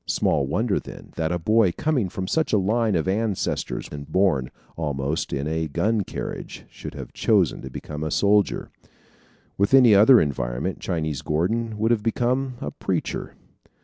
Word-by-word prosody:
Small 70 Hz, -3 st, +1 dB
wonder, 110 Hz, -, 0 dB
then, -, -, -11 dB
that 80 Hz, 0 st, -1 dB
a 90 Hz, -, 0 dB
boy 110 Hz, +2 st, +3 dB
coming 145 Hz, -11 st, 0 dB
from 95 Hz, +1 st, -4 dB
such 160 Hz, +11 st, 0 dB
a -, -, +5 dB
line 110 Hz, +2 st, +1 dB
of 80 Hz, +1 st, 0 dB
ancestors 105 Hz, 0 st, -1 dB
and 70 Hz, -1 st, -8 dB
born, 85 Hz, -10 st, +2 dB, 0.3 s
almost, 75 Hz, 0 st, -2 dB
in 70 Hz, +2 st, -2 dB
a 80 Hz, 0 st, -1 dB
gun 105 Hz, +9 st, 0 dB
carriage -, -, -6 dB
should -, -, -9 dB
have -, -, -8 dB
chosen -, -, +2 dB
to 65 Hz, -, -7 dB
become 75 Hz, +3 st, -6 dB
a 80 Hz, -, -2 dB
soldier. 100 Hz, +4 st, +2 dB, 0.9 s
With 100 Hz, +6 st, +4 dB
any 125 Hz, -5 st, +7 dB
other 110 Hz, +5 st, +7 dB
environment -, -, -2 dB
Chinese 80 Hz, -4 st, -2 dB
Gordon 110 Hz, +8 st, -1 dB
would 110 Hz, +2 st, +1 dB
have 115 Hz, -3 st, +2 dB
become 125 Hz, +4 st, 0 dB
a 75 Hz, -, -4 dB
preacher. -, -, -3 dB
95 Hz, 165 wpm, -24 LUFS, 75-115 Hz, 0.9 s, any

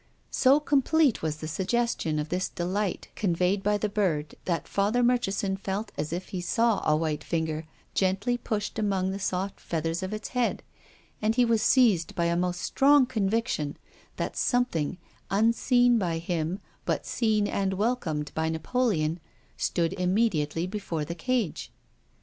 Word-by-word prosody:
So 270 Hz, +2 st, +5 dB
com 290 Hz, -2 st, +2 dB
plete 310 Hz, -3 st, +3 dB
was 155 Hz, -1 st, -2 dB
the 155 Hz, -, -6 dB
suggestion 190 Hz, -2 st, 0 dB
of 150 Hz, +1 st, -2 dB
this 180 Hz, +1 st, -1 dB
delight 185 Hz, +3 st, -2 dB
conveyed 185 Hz, 0 st, +1 dB
by 210 Hz, +1 st, +2 dB
the 210 Hz, -, -1 dB
bird 175 Hz, -8 st, -1 dB
that 170 Hz, -2 st, -1 dB
Father 210 Hz, +5 st, +1 dB
Murchison 205 Hz, -5 st, +1 dB
felt 195 Hz, +2 st, -4 dB
as 155 Hz, -, -3 dB
if 180 Hz, +2 st, -4 dB
he 185 Hz, -, -4 dB
saw 225 Hz, +5 st, +2 dB
a -, -, +5 dB
white 155 Hz, -1 st, -2 dB
finger 160 Hz, -1 st, -2 dB, 0.3 s
gently 195 Hz, +5 st, +1 dB
pushed 215 Hz, -4 st, -3 dB
among 195 Hz, -3 st, 0 dB
the 195 Hz, -, -4 dB
soft 190 Hz, 0 st, -2 dB
feathers 165 Hz, +1 st, -2 dB
of 185 Hz, +1 st, -4 dB
its 215 Hz, 0 st, -5 dB
head, 250 Hz, -2 st, 0 dB, 0.6 s
and 215 Hz, +1 st, +1 dB
he 250 Hz, 0 st, +4 dB
was 230 Hz, -2 st, +2 dB
seized 215 Hz, -11 st, +3 dB
by 170 Hz, -, +1 dB
a 170 Hz, 0 st, +1 dB
most 180 Hz, 0 st, -1 dB
strong 280 Hz, 0 st, +5 dB
conviction 215 Hz, -, -1 dB, 0.4 s
that -, -, -3 dB
something, 185 Hz, -, 0 dB, 0.3 s
unseen 235 Hz, +3 st, +3 dB
by 170 Hz, -4 st, -1 dB
him 170 Hz, +2 st, -2 dB, 0.2 s
but -, -, -1 dB
seen 215 Hz, -3 st, +1 dB
and 195 Hz, -1 st, -1 dB
welcomed 185 Hz, -, -1 dB
by 160 Hz, 0 st, 0 dB
Napoleon, 165 Hz, -2 st, 0 dB, 0.4 s
stood 170 Hz, 0 st, 0 dB
im 180 Hz, +1 st, +1 dB
mediately 165 Hz, -7 st, +1 dB
before 185 Hz, -6 st, -3 dB
the 170 Hz, -, -4 dB
cage. 210 Hz, +1 st, -2 dB
195 Hz, 160 wpm, -27 LUFS, 165-230 Hz, 0.6 s, So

